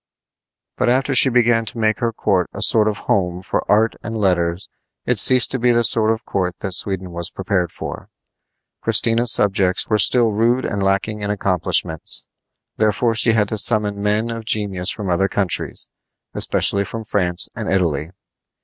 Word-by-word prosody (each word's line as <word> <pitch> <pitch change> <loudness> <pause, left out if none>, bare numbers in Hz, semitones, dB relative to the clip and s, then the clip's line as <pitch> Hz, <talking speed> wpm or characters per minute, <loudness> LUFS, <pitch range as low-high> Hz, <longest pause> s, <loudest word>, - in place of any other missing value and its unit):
But - - +1
after 130 +2 +1
she 130 +1 +5
began 120 -2 +2
to 110 - -5
make 110 -1 0
her 115 -1 -1
court 95 -5 -1
a - - -2
sort 110 -1 +3
of 105 - -2
home 90 -2 -1
for - - -2
art 110 +2 +3
and 110 0 -6
letters 90 -1 -1 0.4
it - - +2
ceased 130 -1 +4
to 130 - 0
be 120 +1 +2
the 120 0 +2
sort 110 -1 +2
of 110 0 -2
court 90 -2 -3
that 95 -2 -3
Sweden 95 -1 0
was 85 0 -3
prepared 90 -3 -2
for. - - -8 0.7
Christina's 115 +1 +3
subjects 95 -3 +1
were 110 -1 +1
still 115 +3 +3
rude 120 +4 0
and 100 - -3
lacking 100 +2 -1
in 100 - -4
accomplishments; 90 -5 -2 0.5
therefore 110 +2 +1
she 115 +1 +3
had 105 -2 +1
to 110 - +3
summon 105 -2 +1
men 105 +3 0
of 115 -1 -6
genius 100 -5 -1
from 105 -3 -3
other 90 +2 +1
countries, 100 -2 0 0.5
especially 100 0 +1
from 110 +3 -7
France 90 -5 +1
and - - -4
Italy. 80 -5 -1
105 Hz, 175 wpm, -19 LUFS, 95-115 Hz, 0.7 s, she